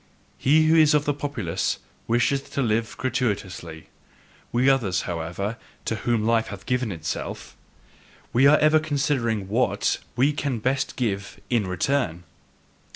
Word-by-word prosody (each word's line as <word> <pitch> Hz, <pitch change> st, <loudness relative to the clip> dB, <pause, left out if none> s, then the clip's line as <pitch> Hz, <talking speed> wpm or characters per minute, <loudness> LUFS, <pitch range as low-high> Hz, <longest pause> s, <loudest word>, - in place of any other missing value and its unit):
He 155 Hz, +4 st, +4 dB
who 160 Hz, +1 st, +4 dB
is 155 Hz, -2 st, +6 dB
of 150 Hz, 0 st, +2 dB
the 145 Hz, -, +1 dB
populace 140 Hz, -, -2 dB, 0.3 s
wisheth 120 Hz, +4 st, +1 dB
to 140 Hz, -, 0 dB
live 110 Hz, -2 st, -1 dB
gratuitously; 100 Hz, -10 st, -3 dB, 0.7 s
we 125 Hz, +2 st, +2 dB
others, 115 Hz, -10 st, +2 dB
however, 90 Hz, +6 st, -4 dB, 0.3 s
to 110 Hz, -, -1 dB
whom 110 Hz, 0 st, 0 dB
life 115 Hz, 0 st, +2 dB
hath 100 Hz, -1 st, -8 dB
given 125 Hz, -3 st, 0 dB
itself 80 Hz, -4 st, -5 dB, 0.8 s
we 130 Hz, +4 st, +6 dB
are 150 Hz, +2 st, +7 dB
ever 155 Hz, +1 st, +5 dB
considering 135 Hz, -9 st, 0 dB
WHAT 115 Hz, +6 st, +1 dB, 0.2 s
we 140 Hz, +4 st, +3 dB
can 140 Hz, -3 st, -2 dB
best 130 Hz, +4 st, -1 dB
give 100 Hz, -5 st, -3 dB
IN 115 Hz, -5 st, +2 dB
RETURN! 90 Hz, -, -1 dB
120 Hz, 140 wpm, -24 LUFS, 100-140 Hz, 0.8 s, are